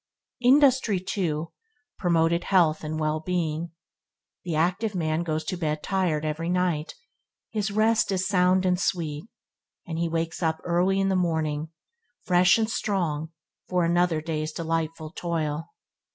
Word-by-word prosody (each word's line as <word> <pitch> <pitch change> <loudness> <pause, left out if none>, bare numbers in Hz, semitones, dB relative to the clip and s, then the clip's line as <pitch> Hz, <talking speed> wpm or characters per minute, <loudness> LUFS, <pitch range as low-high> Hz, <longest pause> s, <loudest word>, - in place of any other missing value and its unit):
Industry, 255 -5 +4
too, 170 -4 -2 0.5
promoted 170 -1 +2
health 170 -6 +3
and 155 +1 -3
well 155 0 0
being. 170 -1 -2 0.7
The 170 -3 -3
active 180 +6 0
man 160 -2 0
goes 160 -2 -2
to 180 +3 -3
bed 150 -2 -2
tired 180 -6 0
every 155 +2 -2
night; 180 -4 0 0.6
his 215 -2 -1
rest 215 +1 +2
is 185 -1 0
sound 185 -1 +3
and 180 -1 +2
sweet, 160 -2 -2 0.6
and 165 -1 -4
he 170 0 0
wakes 165 +1 -2
up 160 -1 0
early 180 +3 +2
in 195 0 +2
the 190 - +1
morning, 160 -3 0 0.5
fresh 180 +2 +5
and 220 -1 +1
strong 175 -8 -1 0.4
for 180 -2 +2
another 170 -1 +2
day's 155 -1 -3
delightful 165 -1 -3
toil. 165 -2 -2
170 Hz, 140 wpm, -26 LUFS, 155-185 Hz, 0.7 s, fresh